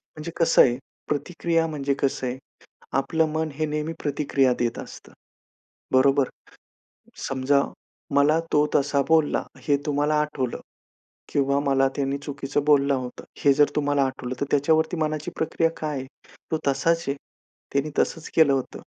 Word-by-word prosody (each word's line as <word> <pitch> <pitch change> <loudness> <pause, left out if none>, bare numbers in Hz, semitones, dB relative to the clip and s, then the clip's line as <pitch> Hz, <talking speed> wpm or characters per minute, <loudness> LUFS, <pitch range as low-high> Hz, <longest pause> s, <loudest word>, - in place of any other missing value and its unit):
म्हणजे 155 +2 -6
कसं 165 -1 +5
आहे 120 -1 +4 0.3
प्रतिक्रिया 165 +2 0
म्हणजे 140 -3 -1
कसं 135 -1 0
आहे 125 +1 -3 0.6
आपलं 160 +4 +1
मन 160 0 -1
हे 155 +2 -1
नेहमी 150 +2 -2
प्रतिक्रिया 140 -2 +1
देत 120 -1 -1
असतं, - - -10 0.8
बरोबर? 135 +1 +4 1.0
समजा, 135 +1 +2 0.5
मला 150 +3 +4
तो 150 0 +4
तसा 140 0 +2
बोलला 160 -2 +3 0.2
हे 145 - +4
तुम्हाला 150 0 +1
आठवलं 140 -5 -3 0.7
किंवा 140 0 +2
मला 135 -1 +3
त्यांनी 140 0 -1
चुकीचं 140 0 -3
बोलला 140 -2 +4
होता 125 -2 -5 0.2
हे 140 - +5
जर 145 +1 +5
तुम्हाला 145 -1 +2
आठवलं 130 -1 -4
तर 140 - 0
त्याच्यावरती 160 +4 +2
मनाची 155 -1 -2
प्रक्रिया 165 +1 +1
काय 150 -3 -3
आहे? 130 - -6 0.4
तो 160 - +1
तसाच 165 +5 +1
आहे. 140 - +1 0.6
त्यांनी 140 +2 0
तसंच 165 -1 0
केलं 155 -4 +6
होतं. 135 -2 -2
145 Hz, 145 wpm, -24 LUFS, 135-155 Hz, 1.0 s, केलं